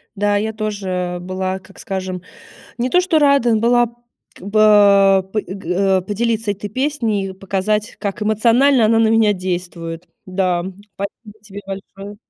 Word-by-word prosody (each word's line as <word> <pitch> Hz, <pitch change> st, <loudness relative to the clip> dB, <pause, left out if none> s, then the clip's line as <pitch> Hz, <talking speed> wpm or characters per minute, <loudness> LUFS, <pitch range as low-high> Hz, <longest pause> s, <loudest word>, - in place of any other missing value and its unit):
Да, 205 Hz, 0 st, +1 dB
я 220 Hz, +2 st, -2 dB
тоже 190 Hz, -5 st, -3 dB
была, 185 Hz, +1 st, -3 dB
как 190 Hz, +1 st, -18 dB
скажем, 185 Hz, -2 st, -4 dB, 0.6 s
не 245 Hz, +2 st, 0 dB
то 360 Hz, -, +4 dB
что 365 Hz, -3 st, +2 dB
рада 280 Hz, -6 st, +3 dB
была 240 Hz, +2 st, +3 dB, 0.5 s
как 190 Hz, -, -13 dB
бы 200 Hz, -2 st, +5 dB
п 215 Hz, -, 0 dB
э, -, -, -16 dB
г 195 Hz, -4 st, -10 dB, 0.3 s
э, -, -, -1 dB
поделиться 220 Hz, +2 st, -1 dB
этой 205 Hz, +1 st, -7 dB
песней 230 Hz, -7 st, -1 dB
и 190 Hz, -, -7 dB
показать, 195 Hz, +3 st, -2 dB
как 200 Hz, 0 st, -4 dB
эмоционально 230 Hz, +3 st, +3 dB
она 225 Hz, +1 st, +3 dB
на 225 Hz, -1 st, +4 dB
меня 220 Hz, -2 st, +4 dB
действует. 175 Hz, -2 st, -5 dB, 0.2 s
Да. 185 Hz, -2 st, 0 dB, 0.3 s
Спасибо 210 Hz, +2 st, -8 dB
тебе 205 Hz, -1 st, -10 dB
большое! 195 Hz, +1 st, -8 dB
205 Hz, 155 wpm, -18 LUFS, 190-220 Hz, 0.6 s, бы